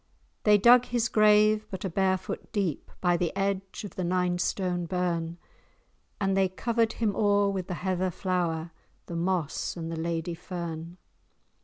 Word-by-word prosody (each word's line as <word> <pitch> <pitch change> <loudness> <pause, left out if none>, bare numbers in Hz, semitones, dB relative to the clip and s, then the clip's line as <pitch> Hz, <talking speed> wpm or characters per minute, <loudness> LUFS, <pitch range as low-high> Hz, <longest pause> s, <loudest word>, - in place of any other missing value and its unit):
They 210 -1 +7
dug 240 +4 +7
his 240 -2 0
grave 215 0 +4
but 190 0 -5
a - - +1
bare 190 +1 +2
foot 185 - -7
deep, 195 -9 -2
By 175 -1 +3
the 170 -1 0
edge 195 0 -2
of 205 - -7
the 185 - -3
Ninestone 180 0 0
Burn, 170 -1 -1 0.8
And 195 -1 +1
they 190 -1 +3
covered 230 +4 0
him 215 -3 -1
o'er 205 -1 +3
with 190 -2 -3
the 180 - -3
heather 185 0 -1
flower, 175 -3 -2 0.3
The 170 - -6
moss 170 -2 -1
and 165 -1 -4
the 165 - -4
Lady 165 +1 -2
fern. 170 -1 -6
185 Hz, 160 wpm, -28 LUFS, 170-200 Hz, 0.8 s, They